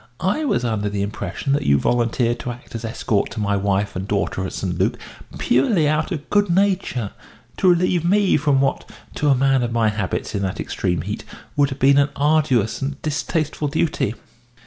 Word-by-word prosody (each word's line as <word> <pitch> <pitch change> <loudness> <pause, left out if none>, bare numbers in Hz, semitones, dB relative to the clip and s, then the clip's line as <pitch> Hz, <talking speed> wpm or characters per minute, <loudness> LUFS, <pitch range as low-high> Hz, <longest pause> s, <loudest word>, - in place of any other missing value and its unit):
I 205 - 0
was 125 - 0
under 105 -3 -1
the 100 -1 -2
impression 105 +5 -3
that 145 - +1
you 70 0 +3
volunteered 120 - +1
to - - -5
act 120 +1 -12
as 115 0 -5
escort 110 -2 -1
to - - -5
my 100 -1 +1
wife 100 +1 0
and 95 +2 -4
daughter 100 -2 -1
at - - -8
St. 90 -3 -3
Luc - - +1 0.4
purely 150 - +2
out 155 +4 0
of 150 -5 -4
good 205 -1 +3
nature 180 - +1 0.5
to 185 - +4
relieve 175 -1 +2
me 195 +2 +3
from 145 -2 +2
what 135 - -1 0.2
to 150 - 0
a 135 - +5
man 135 0 +3
of 120 -1 -1
my 115 -2 +2
habits 105 -3 -3
in 100 - -1
that 95 -2 -3
extreme 90 -3 -1
heat 105 +3 -5 0.3
would 145 -1 +3
have 135 - -5
been 140 +1 +5
an 140 0 +3
arduous 145 -8 +2
and 135 +1 -3
distasteful 155 0 -1
duty." 145 -7 0
130 Hz, 195 wpm, -21 LUFS, 105-155 Hz, 0.5 s, a